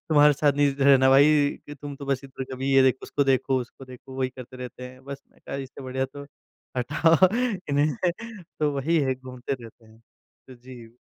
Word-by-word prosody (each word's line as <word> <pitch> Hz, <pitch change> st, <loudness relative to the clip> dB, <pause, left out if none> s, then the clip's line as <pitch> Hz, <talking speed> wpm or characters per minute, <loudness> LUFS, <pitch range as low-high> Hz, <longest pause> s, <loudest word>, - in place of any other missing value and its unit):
तुम्हारे 150 Hz, -1 st, +6 dB
साथ 145 Hz, 0 st, +2 dB
नहीं 140 Hz, -1 st, +2 dB
रहना 135 Hz, -1 st, +6 dB
भाई 145 Hz, +1 st, +5 dB, 0.2 s
कि 145 Hz, -, -8 dB
तुम 145 Hz, +1 st, -8 dB
तो 140 Hz, -, -9 dB
बस 135 Hz, -2 st, 0 dB
इधर 130 Hz, 0 st, -7 dB
कभी 135 Hz, +1 st, -2 dB
ये 135 Hz, -, +7 dB
देखो 130 Hz, 0 st, +2 dB
उसको 140 Hz, -, -1 dB
देखो, 135 Hz, 0 st, +2 dB
उसको 125 Hz, +2 st, -10 dB
देखो 130 Hz, +1 st, -12 dB
वही 130 Hz, -1 st, 0 dB
करते 130 Hz, 0 st, -10 dB
रहते 125 Hz, 0 st, -9 dB
हैं। 130 Hz, +1 st, -16 dB
बस 140 Hz, 0 st, -8 dB
मैंने -, -, -28 dB
कहा 135 Hz, -, -4 dB
इससे 135 Hz, 0 st, -8 dB
बढ़िया 130 Hz, 0 st, -2 dB
तो 140 Hz, +1 st, -9 dB, 0.5 s
हटाओ 165 Hz, +8 st, +4 dB, 0.4 s
इन्हें 145 Hz, +1 st, +2 dB, 0.7 s
तो 150 Hz, -1 st, +2 dB
वही 160 Hz, +5 st, +1 dB
है 135 Hz, -3 st, +1 dB
घूमते 130 Hz, 0 st, -7 dB
रहते 115 Hz, 0 st, -14 dB
हैं। 110 Hz, +1 st, -20 dB, 0.5 s
तो 130 Hz, -, -11 dB
जी। 120 Hz, -2 st, -13 dB
135 Hz, 200 wpm, -25 LUFS, 130-145 Hz, 0.7 s, ये